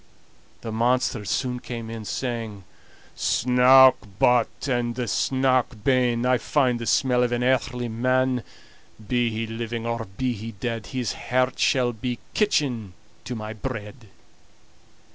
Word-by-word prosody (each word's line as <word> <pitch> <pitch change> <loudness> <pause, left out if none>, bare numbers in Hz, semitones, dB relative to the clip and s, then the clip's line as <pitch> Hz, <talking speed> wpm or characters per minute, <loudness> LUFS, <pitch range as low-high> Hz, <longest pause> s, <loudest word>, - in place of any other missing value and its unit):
The 115 - -5
monster 120 0 +1
soon 125 +4 -1
came 120 -2 -6
in, 115 -1 -7
saying: 115 -5 -4 0.5
"Snouk 130 +2 +5 0.2
but 125 +3 +2
and 120 -2 -1
snouk 130 -1 0
ben, 125 -2 +2
I 125 -1 +3
find 130 -5 +1
the 115 - -5
smell 125 +2 +2
of 125 -1 +1
an 120 0 0
earthly 125 -1 0
man; 130 +2 +1 0.7
Be 120 0 +1
he 115 +1 -3
living, 115 +1 -5
or 115 -1 -2
be 130 -1 0
he 115 +1 -7
dead, 115 +2 -4
His 130 -3 -2
heart 130 +1 -1
shall 125 -3 +2
be 120 +2 -4 0.2
kitchen 130 - 0 0.3
to 125 - -4
my 110 -1 -6
bread." 110 0 -7
120 Hz, 135 wpm, -24 LUFS, 115-130 Hz, 0.7 s, Snouk